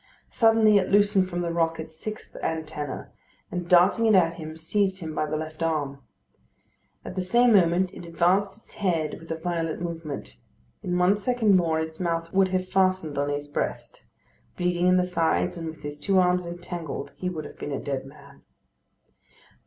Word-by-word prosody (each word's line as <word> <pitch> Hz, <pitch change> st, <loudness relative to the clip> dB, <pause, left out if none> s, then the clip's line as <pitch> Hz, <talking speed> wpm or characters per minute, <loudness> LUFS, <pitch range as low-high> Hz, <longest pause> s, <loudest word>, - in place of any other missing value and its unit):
Suddenly 225 Hz, -3 st, +5 dB
it 185 Hz, -, -2 dB
loosened 205 Hz, -2 st, +3 dB
from 175 Hz, -1 st, -2 dB
the 170 Hz, -1 st, -2 dB
rock 165 Hz, -1 st, 0 dB
its 160 Hz, 0 st, -8 dB
sixth 215 Hz, +6 st, -8 dB
antenna, 155 Hz, -3 st, -4 dB, 0.4 s
and 175 Hz, -1 st, -4 dB
darting 185 Hz, +6 st, +5 dB
it 215 Hz, -, +5 dB
at 170 Hz, -3 st, +4 dB
him, 160 Hz, -2 st, -8 dB
seized 190 Hz, +4 st, 0 dB
him 160 Hz, -3 st, -5 dB
by 155 Hz, -, -1 dB
the 155 Hz, -, -2 dB
left 155 Hz, +1 st, -7 dB
arm. 150 Hz, -4 st, -1 dB, 1.1 s
At -, -, -6 dB
the 185 Hz, -, -2 dB
same 235 Hz, +6 st, +4 dB
moment 180 Hz, -1 st, +3 dB
it -, -, -9 dB
advanced 180 Hz, +4 st, +1 dB
its 220 Hz, -, -18 dB
head 165 Hz, -7 st, -1 dB
with 165 Hz, -, -14 dB
a 165 Hz, -, -1 dB
violent 165 Hz, -1 st, -2 dB
movement. 155 Hz, -, -6 dB, 0.4 s
In 180 Hz, -1 st, -1 dB
one 180 Hz, +3 st, +4 dB
second 220 Hz, -1 st, +2 dB
more 165 Hz, -3 st, +2 dB
its 160 Hz, 0 st, -5 dB
mouth 165 Hz, -2 st, -2 dB
would 190 Hz, 0 st, +4 dB
have 185 Hz, 0 st, -1 dB
fastened 185 Hz, -6 st, +1 dB
on 145 Hz, 0 st, 0 dB
his 145 Hz, 0 st, -3 dB
breast. 145 Hz, -, -4 dB, 0.5 s
Bleeding 180 Hz, 0 st, +1 dB
in 180 Hz, 0 st, +5 dB
the 180 Hz, -, +3 dB
sides, 165 Hz, -, 0 dB
and 165 Hz, -1 st, -5 dB
with 160 Hz, -1 st, -11 dB
his 145 Hz, 0 st, -6 dB
two 195 Hz, +5 st, +1 dB
arms 180 Hz, -1 st, +3 dB
entangled, 175 Hz, -4 st, -6 dB
he 180 Hz, -, -3 dB
would 160 Hz, -4 st, -5 dB
have -, -, -11 dB
been 145 Hz, -, -5 dB
a 140 Hz, -, -2 dB
dead 135 Hz, -2 st, -3 dB
man. 140 Hz, 0 st, -16 dB
170 Hz, 185 wpm, -26 LUFS, 160-185 Hz, 1.1 s, Suddenly